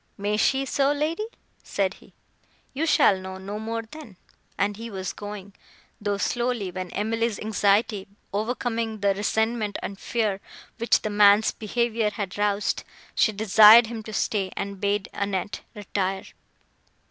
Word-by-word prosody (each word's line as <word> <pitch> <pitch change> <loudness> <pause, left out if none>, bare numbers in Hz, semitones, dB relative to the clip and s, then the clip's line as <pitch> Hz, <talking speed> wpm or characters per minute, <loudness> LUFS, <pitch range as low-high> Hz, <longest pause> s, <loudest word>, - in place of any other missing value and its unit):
"May 205 +1 -1
she 265 +5 +2
so, 275 +1 +2
lady?" 315 +8 -1 0.3
said 195 -1 -1
he. - - -19 0.6
"You 310 +5 -1
shall 195 -10 +4
know 190 0 -7
no 200 +2 -6
more, 225 +1 -3
then;" 225 - -12 0.4
and 205 +1 0
he 230 +2 -7
was 190 -3 -4
going, 205 -1 -8 0.5
though 205 -1 -1
slowly, 235 -3 -1
when 185 0 -5
Emily's 225 +2 -1
anxiety, 205 -1 +1 0.3
overcoming 225 0 -2
the 200 -1 +3
resentment 220 +1 -1
and 195 0 -5
fear, 210 -4 -1 0.4
which 235 - +2
the 215 - -2
man's 205 +1 +5
behaviour 225 0 -1
had 205 -3 -5
roused, 205 0 0 0.3
she 220 - +3
desired 220 +2 +8
him 225 0 -6
to 220 - -9
stay, 200 -2 -1
and 200 -1 -4
bade 200 -1 0
Annette 200 0 -2
retire. 195 -2 -2
210 Hz, 145 wpm, -25 LUFS, 200-230 Hz, 0.6 s, desired